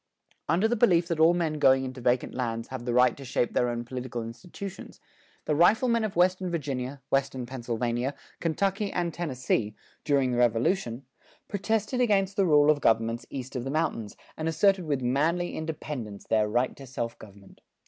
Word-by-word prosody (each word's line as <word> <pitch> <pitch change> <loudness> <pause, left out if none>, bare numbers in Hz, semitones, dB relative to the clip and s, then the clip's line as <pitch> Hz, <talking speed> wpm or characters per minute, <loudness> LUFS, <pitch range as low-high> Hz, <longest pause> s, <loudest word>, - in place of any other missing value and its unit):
[168:1] - - +4
Under 195 +6 +3
the 240 - +1
belief 180 -7 +4
that 165 -2 -1
all 165 +2 +6
men 160 -3 -1
going 130 -1 +5
into 130 -1 -6
vacant 125 +1 +1
lands 115 -2 -3
have 130 -2 -6
the 120 - -1
right 125 -1 +5
to 140 - -10
shape 125 -2 -1
their 125 - +2
own 120 0 -3
political 125 -1 -5
institutions, 165 - -9 0.5
the - - +1
riflemen 225 - +4
of 215 -3 -3
western 185 +1 +2
Virginia, 140 -4 -3
western 135 -2 0
Pennsylvania, 120 +1 -2 0.2
Kentucky 195 +5 0
and 175 -2 -1
Tennessee, 130 -9 -1 0.3
during 140 -4 +2
the 120 - 0
Revolution, 120 - +1 0.4
protested 220 +4 -1
against 200 -4 +2
the 195 -2 +2
rule 150 -1 +6
of 145 -1 -1
governments 115 +1 +1
east 130 0 -7
of 125 - -2
the 135 - -4
mountains, 140 -8 -2 0.2
and 160 +1 -2
asserted 190 +2 +3
with 140 -4 -1
manly 160 +8 +1
independence 145 -9 -5
their 110 -1 +2
right 120 +4 0
to 135 - -10
self 120 -2 -4
government. 100 -2 -15
135 Hz, 180 wpm, -27 LUFS, 120-175 Hz, 0.5 s, all